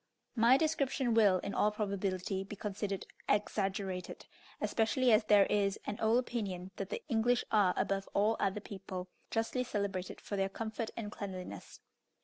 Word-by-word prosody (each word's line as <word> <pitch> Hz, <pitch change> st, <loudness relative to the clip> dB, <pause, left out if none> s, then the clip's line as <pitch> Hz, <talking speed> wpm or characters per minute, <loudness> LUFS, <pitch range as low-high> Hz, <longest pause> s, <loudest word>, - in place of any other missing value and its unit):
My 235 Hz, +3 st, +6 dB
description 275 Hz, -5 st, +1 dB
will, 205 Hz, -5 st, +5 dB
in 200 Hz, -, -4 dB
all 210 Hz, -, +3 dB
probability, 195 Hz, -2 st, -2 dB
be 200 Hz, +2 st, -8 dB
considered 200 Hz, -1 st, -3 dB, 0.2 s
exaggerated, 195 Hz, -2 st, -1 dB, 0.3 s
especially 245 Hz, +3 st, +2 dB
as 215 Hz, 0 st, +5 dB
there 205 Hz, -2 st, +6 dB
is 200 Hz, -1 st, +1 dB
an 205 Hz, -, -4 dB
old 220 Hz, +2 st, +4 dB
opinion 200 Hz, -7 st, -3 dB
that -, -, -4 dB
the 480 Hz, -1 st, -4 dB
English 240 Hz, -1 st, +2 dB
are, 205 Hz, -5 st, +4 dB
above 195 Hz, 0 st, 0 dB
all 210 Hz, +3 st, +3 dB
other 195 Hz, +1 st, 0 dB
people, 190 Hz, -2 st, -7 dB, 0.2 s
justly 225 Hz, +3 st, 0 dB
celebrated 200 Hz, -6 st, -3 dB
for 205 Hz, -, -5 dB
their 195 Hz, 0 st, +1 dB
comfort 220 Hz, +2 st, -4 dB
and 210 Hz, -3 st, -4 dB
cleanliness. 185 Hz, -3 st, -7 dB
205 Hz, 150 wpm, -33 LUFS, 195-225 Hz, 0.3 s, My